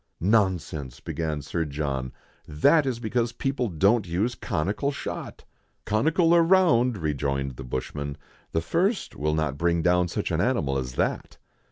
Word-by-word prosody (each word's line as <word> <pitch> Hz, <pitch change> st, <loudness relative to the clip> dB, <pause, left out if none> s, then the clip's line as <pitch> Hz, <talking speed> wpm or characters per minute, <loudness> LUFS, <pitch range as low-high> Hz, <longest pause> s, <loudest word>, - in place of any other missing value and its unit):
"Nonsense!" 90 Hz, -, 0 dB
began 80 Hz, -3 st, -3 dB
Sir 80 Hz, +4 st, -2 dB
John, 70 Hz, -4 st, -3 dB, 0.4 s
"that 135 Hz, -, +3 dB
is 125 Hz, -3 st, -1 dB
because 120 Hz, +1 st, -1 dB
people 135 Hz, -2 st, -1 dB
don't 100 Hz, +4 st, +2 dB
use 100 Hz, +9 st, 0 dB
conical 105 Hz, -, -1 dB
shot." 140 Hz, -, -6 dB, 0.4 s
"Conical 160 Hz, -, +3 dB
or 170 Hz, -, +6 dB
round," 165 Hz, -, +4 dB
rejoined 70 Hz, -4 st, -1 dB
the 65 Hz, -, -8 dB
bushman, 70 Hz, +3 st, -4 dB, 0.2 s
" -, -, -33 dB
the 80 Hz, -, 0 dB
first 185 Hz, -, 0 dB
will 75 Hz, +1 st, 0 dB
not 75 Hz, -3 st, -1 dB
bring 85 Hz, -1 st, +1 dB
down 90 Hz, 0 st, +3 dB
such 85 Hz, -, -3 dB
an -, -, +1 dB
animal 70 Hz, 0 st, +1 dB
as 65 Hz, -1 st, -5 dB
that." -, -, -2 dB
85 Hz, 155 wpm, -26 LUFS, 75-120 Hz, 0.4 s, or